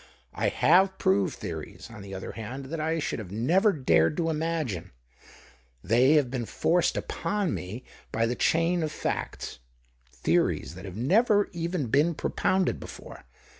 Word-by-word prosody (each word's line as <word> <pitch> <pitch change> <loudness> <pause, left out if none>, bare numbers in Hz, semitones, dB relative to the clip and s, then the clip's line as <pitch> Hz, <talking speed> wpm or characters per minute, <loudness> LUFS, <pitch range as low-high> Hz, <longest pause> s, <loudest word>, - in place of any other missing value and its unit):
I - - 0
have 190 +4 +4
proved 95 0 +2
theories, - - -7
on 110 -3 -10
the 100 -1 -8
other 95 - -6
hand, 125 +5 -7
that 165 - -3
I 160 +1 0
should 150 - -2
have 105 -5 -7
never 170 - +3
dared 80 - +2
to 165 -1 +1
imagine 150 - -2 0.5
— 60 -1 -27
they 130 +5 +6
have 145 -5 +3
been 120 -4 -3
forced 175 +1 +1
upon 205 -4 -2
me 105 +8 -6 0.3
by 115 +1 +1
the 115 - 0
chain 165 +6 +2
of 155 -1 -1
facts - - -4 0.3
— - - -37
theories - - +1
that 95 +3 -10
have 95 0 -8
never 205 - +3
even 170 -3 -2
been 145 +8 +2
propounded 185 +4 0
before. - - -10
135 Hz, 165 wpm, -27 LUFS, 100-170 Hz, 0.5 s, they